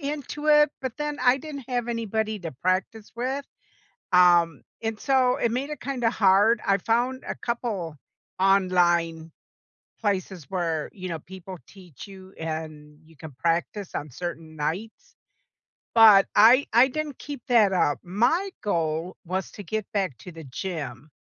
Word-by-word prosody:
into 295 +1 -5
it, 300 -1 +6
but 260 -3 -3
then 295 0 -3
I 250 +1 +4
didn't 280 -2 -8
have 245 -2 -1
anybody 220 -2 -2
to 170 -3 -6
practice 190 +4 -1
with, 260 +4 -3 0.7
um, 175 -4 +5 0.2
and 225 -1 -3
so 255 +1 +2
it 235 - 0
made 260 +4 -2
it 300 - -6
kinda 250 -3 -1
hard. 205 +2 +4
I 195 0 +3
found 240 +6 0
a - - -2
couple 210 -10 -4 0.4
online 175 -4 +2 0.7
places 190 -6 -2
where, 165 -5 -2
you 185 -2 -7
know, 165 -3 -4
people 185 +1 -10
teach 185 -4 -13
you 190 -1 -13
and 155 -2 -6
you 160 0 -20
can 155 +2 -10
practice 170 +5 -1
on 145 -1 -4
certain 165 +1 -7
nights, 175 +9 -5 0.8
but 215 -4 +8
I 235 +6 +6
I 245 +4 +6
didn't 300 0 -4
keep 280 0 -8
that 220 -5 +5
up. 145 -5 +2
My 240 - +1
goal 165 -2 -1
was 185 +1 -3
to 205 - -9
get 215 +3 -3
back 190 - -1
to 180 - -10
the 165 -1 -10
gym 145 -2 -6
195 Hz, 155 wpm, -25 LUFS, 170-240 Hz, 0.8 s, but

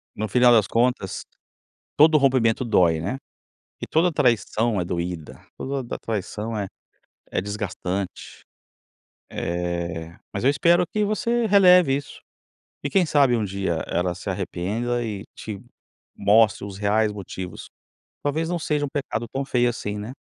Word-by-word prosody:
No 110 -1 -3
final 125 +1 +5
das 110 -3 +5
contas, 115 -4 0 0.7
todo 155 +1 +7
rompimento 130 -3 +2
dói, 85 -8 +3
né. 115 +11 -3 0.6
E - - -4
toda 165 +3 +3
a - - -3
traição 115 -5 +1
é - - -1
doída, 85 -2 -4 0.2
toda 135 0 -3
da 120 - -6
traição, 110 +1 -4
é 100 -2 -2 0.7
é - - +2
desgastante. 100 -2 -5 0.9
Eh, 85 -1 -3 0.2
mas 100 - -3
eu 135 - +5
espero 170 +4 +4
que 210 -1 0
você 230 +3 0
releve 180 -8 +6
isso, 145 - -7 0.6
e 140 - -1
quem 185 +4 +3
sabe 140 -6 +3
um 110 - 0
dia 95 -4 -2
ela 90 0 0
se 95 +2 -5
arrependa 105 +6 -2
e 105 -3 -5
te 105 -3 -7 0.6
mostre 105 0 +4
os 100 -1 -8
reais 105 +1 +2
motivos. 95 -3 -7 0.6
Talvez 160 +3 -1
não 175 -1 -1
seja 150 -2 -1
um - - -6
pecado 130 -4 -3
tão 135 +1 -2
feio, 125 -2 +2
assim, 105 -3 -4
né. 105 +4 -6
110 Hz, 150 wpm, -24 LUFS, 95-140 Hz, 0.9 s, todo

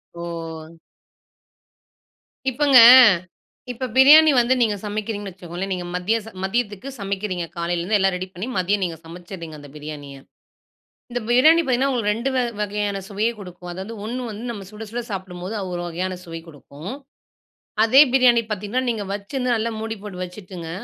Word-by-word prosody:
ஓ! 165 -1 -7 1.7
இப்பங்க. 270 -1 +5 0.9
இப்ப 250 +1 -4
பிரியாணி 300 +4 +8
வந்து 245 +2 +3
நீங்க 215 -3 +2
சமைக்கிறீங்கன்னு 205 -1 -4
வச்சுக்கோங்களேன்! 180 +2 -6
நீங்க 180 -1 -4
மத்தியச 215 +5 -1
மதியத்துக்கு 215 +3 -2
சமைக்கிறீங்க! 195 -3 -3
காலையிலேருந்து 175 +4 0
எல்லாம் 195 -1 +2
ரெடி 185 +1 -4
பண்ணி 190 +8 -5
மதியம் 195 +2 +1
நீங்க 170 -3 -3
சமைச்சிறீங்க 170 -1 -9
அந்த 145 0 -12
பிரியாணிய. 145 -2 -8 1.0
இந்த 245 - -2
பிரியாணி 310 +8 +6
பார்த்தீங்கன்னா, 265 0 +1
உங்களுக்கு 210 -4 +1
2 235 +5 -2
வ - - +3 0.2
வகையான 205 -1 -2
சுவையே 215 +3 0
குடுக்கும். 180 -2 -10
அதாவது 190 +5 -7
1 245 +3 -4
வந்து 215 +3 -8
நம்ம 205 -4 -7
சுட 210 +1 -10
சுட 240 +2 -3
சாப்பிடும்போது 185 +1 -6
அது 190 - -5
ஒரு 175 - -3
வகையான 180 +2 -3
சுவை 165 -1 -7
கொடுக்கும். 150 - -10 0.9
அதே 265 +5 +7
பிரியாணி 250 -3 +5
பார்த்தீங்கன்னா, 210 +5 -2
நீங்க 220 -3 -2
வச்சிருந்து 245 +5 -2
நல்லா 225 +1 -1
மூடி 225 0 -4
போட்டு 185 -3 -7
வச்சுட்டுங்க, 180 -2 -9
200 Hz, 145 wpm, -22 LUFS, 180-230 Hz, 1.7 s, பிரியாணி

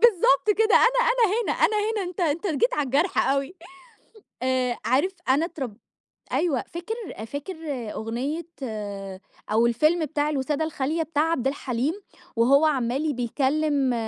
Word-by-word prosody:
بالضبط 390 - +5
كده 445 0 +4
أنا - - +5
أنا 485 -1 +3 0.2
هنا - - -1
أنا 430 - +2
هنا، 420 0 0
أنت 365 - -8
أنت 330 +3 0
جيت 455 +10 +1
على 295 - 0
الجرح 285 +8 +1
أوي 275 +5 0 0.9
آآ 255 -1 0
عارف 285 +10 +2 0.2
أنا 280 +5 +3
اترب 265 - -6 0.6
أيوه 315 -8 +1
فاكر 350 +6 -5 0.3
فاكر 285 +9 -6 0.4
أغنية 260 +10 -3 1.1
أو 230 +2 +4
الفيلم 305 +8 +2
بتاع 295 +1 -1
الوسادة 290 +2 -1
الخالية 315 +1 -1
بتاع 305 -2 0
عبد 265 -6 -1
الحليم 270 +1 -1 0.4
وهو 275 +7 +5
عمّال 275 +2 0
بيكَلّم 270 +2 +1
295 Hz, 135 wpm, -25 LUFS, 260-340 Hz, 1.1 s, بالضبط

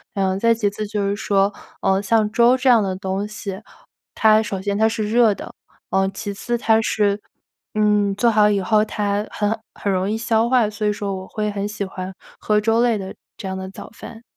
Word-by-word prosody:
然 195 -1 +1
后 190 - 0
再 230 +2 +3
其 215 -2 0
次 210 +1 -5
就 210 -1 -2
是 200 - 0
说， 200 0 +1 0.3
呃， 195 0 +2
像 215 +1 +2
粥 240 +3 +4
这 260 +1 -2
样 235 -3 +6
的 190 -1 -2
东 190 +2 -3
西， 205 -2 -7 0.5
它 220 0 +5
首 205 -3 -4
先 200 0 -1
它 220 +1 +4
是 220 -2 -2
热 230 -3 +4
的， - - -9 0.4
呃， 190 0 +2
其 205 -2 -5
次， 240 +4 -2
它 225 -1 +3
是， 205 -2 +1 0.5
嗯， 210 -2 +2
做 230 +3 +3
好 210 -1 +4
以 200 -2 +1
后 215 +2 +2
它 205 0 -2
很 210 +1 -1
很 200 - -2
容 190 +1 0
易 220 - -1
消 225 0 +1
化， 245 -5 +3
所 210 0 -3
以 210 - +2
说 200 -1 -3
我 190 0 -7
会 210 -1 -2
很 200 0 -3
喜 210 -1 -4
欢 190 -1 -6 0.3
喝 210 0 +1
粥 225 +1 +2
类 235 -3 +2
的 190 -1 -6 0.2
这 210 - -8
样 190 0 -4
的 190 0 -6
早 195 - -10
饭。 225 0 -11
210 Hz, 240 characters per minute, -21 LUFS, 200-220 Hz, 0.5 s, 样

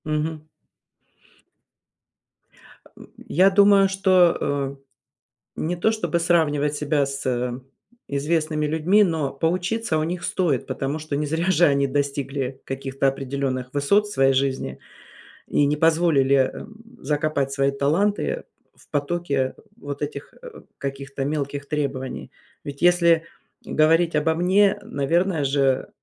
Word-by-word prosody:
Мгм. 155 +1 -2 2.4
А, - - -19
м. - - -14 0.2
Я 185 +4 +4
думаю, 200 0 +5
что, 185 -3 +3
э, 140 -1 -2 0.8
не 175 +3 -2
то, 180 +6 +1
чтобы 215 -6 -1
сравнивать 150 -4 +1
себя 150 -1 0
с, 140 +1 -6
э, 125 -1 -1 0.5
известными 155 +2 -1
людьми, 160 +7 +3
но 160 -7 -1
поучиться 180 +5 -1
у 155 - 0
них 170 +2 -4
стоит, 155 -9 -1
потому 140 +3 -3
что 155 -1 -4
не 150 +1 -1
зря 160 +5 -1
же 175 0 +4
они 140 -2 +2
достигли 140 -1 -2
каких-то 135 0 -2
определенных 135 -1 -3
высот 145 +9 +2
в - - -9
своей 135 -6 +3
жизни 130 - -1 0.7
и 145 - +2
не 145 +1 +1
позволили, 155 -4 +3 0.2
эм, 220 +1 -10 0.3
закопать 145 -2 -1
свои 140 0 +1
таланты 190 - 0 0.3
в - - -23
потоке 145 -3 -1 0.2
вот 145 0 -7
этих, 145 -1 -6
э, 485 -2 -11 0.2
каких-то 135 0 -5
мелких 140 -1 -3
требований. 140 -3 -4 0.3
Ведь 140 -1 -8
если 170 -2 +4 0.4
говорить 165 +2 +2
обо 160 +2 +1
мне, 195 +4 +3
наверное 165 +3 0
же, 135 -1 +1
150 Hz, 130 wpm, -23 LUFS, 140-170 Hz, 2.4 s, думаю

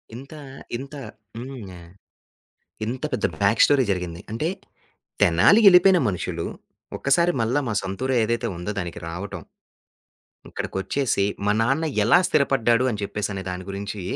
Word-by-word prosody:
ఇంత 135 +5 -10 0.4
ఇంత 140 +3 -9 0.4
హ్మ్. 115 -9 -8 1.0
ఇంత 125 +3 -5
పెద్ద - - 0 0.2
బ్యాక్ - - +4
స్టోరీ 140 -2 +3
జరిగింది. 90 -2 -4
అంటే 115 +8 -2 0.7
తెనాలి 85 - +5
ఎళ్ళిపోయిన 180 0 +6
మనుషులు, 90 -2 -4 0.5
ఒక్కసారి 170 +6 +2
మళ్ళా 120 +5 +1
మా 115 - -1
సొంతురు 110 +8 -3
ఏదైతే 115 +1 -1
ఉందో 90 +4 -4
దానికి 85 -3 -5
రావటం. 90 +4 -6 1.1
ఇక్కడికోచ్చేసి 100 +2 -1 0.2
మా 105 - +3
నాన్న 135 +8 +1 0.2
ఎలా 115 +11 +5
స్థిరపడ్డాడు 125 -4 +2
అని 105 -2 -5
చెప్పేసి 100 0 -3
అనే 95 -1 -5
దాని 90 0 -5
గురించి, 100 +1 -5
115 Hz, 125 wpm, -23 LUFS, 95-135 Hz, 1.1 s, ఎళ్ళిపోయిన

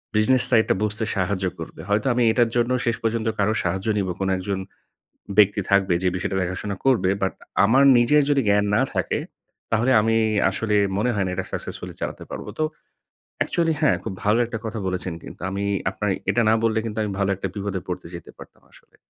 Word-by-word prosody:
Business 125 +4 +4
side 110 -3 +5
টা - - +3
বুঝতে 110 +1 0
সাহায্য 95 0 -1
করবে। - - -8
হয়তো 105 +4 +1
আমি 120 0 +2
এটার 120 0 +2
জন্য 120 +1 +1
শেষ 115 - +1
পর্যন্ত 115 0 -1
কারোর 105 +2 +2
সাহায্য 95 +4 -2
নিব 100 - 0
কোন 95 - -1
১ - - -5
জন 95 -1 0 0.8
ব্যক্তি 105 0 +5
থাকবে 100 -2 +3
যে - - +2
বিষয়টা 95 +1 -2
দেখাশোনা 95 +3 -3
করবে। 110 -9 +3
বাট 95 - 0 0.3
আমার 130 +6 +4
নিজের 145 +5 +4
যদি 140 -1 +3
জ্ঞান 105 0 +3
না - - +3
থাকে, - - -1 0.5
তাহলে 115 +4 +2
আমি 115 +1 +2 0.3
আসলে 105 +2 -1 0.2
মনে 120 +4 +1
হয় 100 -2 0
না - - -2
এটা 95 - -3
সাকসেসফুলি - - -5
চালাতে - - -4
পারব। - - -6
তো - - +2 0.8
অ্যাকচুয়ালি 165 -2 +1
হ্যাঁ 150 - +4
খুব - - -4
ভালো 105 +3 +3
একটা 115 0 -5
কথা 110 0 -4
বলেছেন 90 -1 -3
কিন্তু - - -11
আমি 100 +1 -3 0.3
আপনার 105 +2 -2 0.2
এটা 120 - +2
না - - +5
বললে 110 -1 +2
কিন্তু 110 -1 -5
আমি 105 - -3
ভালো 100 0 +1
একটা 100 +1 -4
বিপদে 100 -2 -3
পড়তে 90 -1 -5
যেতে 85 - -10
পারতাম - - -14
আসলে। - - -22
105 Hz, 200 wpm, -23 LUFS, 95-115 Hz, 0.8 s, side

